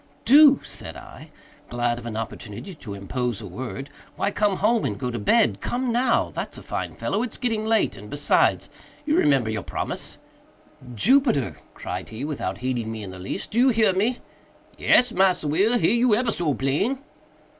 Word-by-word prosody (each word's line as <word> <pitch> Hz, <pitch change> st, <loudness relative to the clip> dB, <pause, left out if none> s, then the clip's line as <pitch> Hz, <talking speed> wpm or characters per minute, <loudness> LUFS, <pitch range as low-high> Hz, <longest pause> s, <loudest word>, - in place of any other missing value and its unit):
"Do!" 285 Hz, +1 st, +7 dB
said -, -, -7 dB
I, -, -, -12 dB, 0.4 s
glad 120 Hz, 0 st, -1 dB
of 120 Hz, -, -8 dB
an 110 Hz, -2 st, -5 dB
opportunity 115 Hz, -, -7 dB
to 110 Hz, -, -8 dB
interpose 120 Hz, +3 st, -3 dB
a 110 Hz, -, -8 dB
word, 125 Hz, +7 st, -7 dB, 0.2 s
"why -, -, -1 dB
come 205 Hz, -1 st, +1 dB
home 225 Hz, +2 st, +2 dB
and 105 Hz, -, -2 dB
go 125 Hz, -2 st, -3 dB
to 120 Hz, -, -4 dB
bed. 220 Hz, -, +2 dB
Come 250 Hz, 0 st, -1 dB
now!—that's 240 Hz, 0 st, 0 dB
a -, -, -10 dB
fine -, -, -4 dB
fellow. 200 Hz, -, -1 dB
It's 245 Hz, -2 st, -4 dB
getting 225 Hz, -3 st, -1 dB
late, 225 Hz, 0 st, +2 dB
and, -, -, -11 dB
besides, -, -, +2 dB, 0.4 s
you 305 Hz, 0 st, +2 dB
remember 135 Hz, -, +3 dB
your 110 Hz, -2 st, -2 dB
promise." -, -, -5 dB, 0.8 s
"Jupiter," 180 Hz, -, +2 dB, 0.2 s
cried 90 Hz, +1 st, -6 dB
he, 115 Hz, +5 st, -6 dB
without 150 Hz, -2 st, -3 dB
heeding 120 Hz, -4 st, -1 dB
me 110 Hz, -1 st, -6 dB
in 95 Hz, -, -7 dB
the 95 Hz, -, -10 dB
least, 90 Hz, -, -5 dB
"do 230 Hz, -, 0 dB
you 260 Hz, +2 st, +6 dB
hear 220 Hz, -5 st, +3 dB
me?" 220 Hz, +7 st, +1 dB, 0.6 s
"Yes, 250 Hz, -1 st, +4 dB
Massa 185 Hz, -6 st, +2 dB
Will, 200 Hz, +11 st, +2 dB
hear 225 Hz, -, +3 dB
you 235 Hz, -2 st, +4 dB
ebber 240 Hz, +1 st, 0 dB
so 160 Hz, -8 st, -1 dB
plain." 150 Hz, -, 0 dB
165 Hz, 180 wpm, -24 LUFS, -, 0.8 s, Do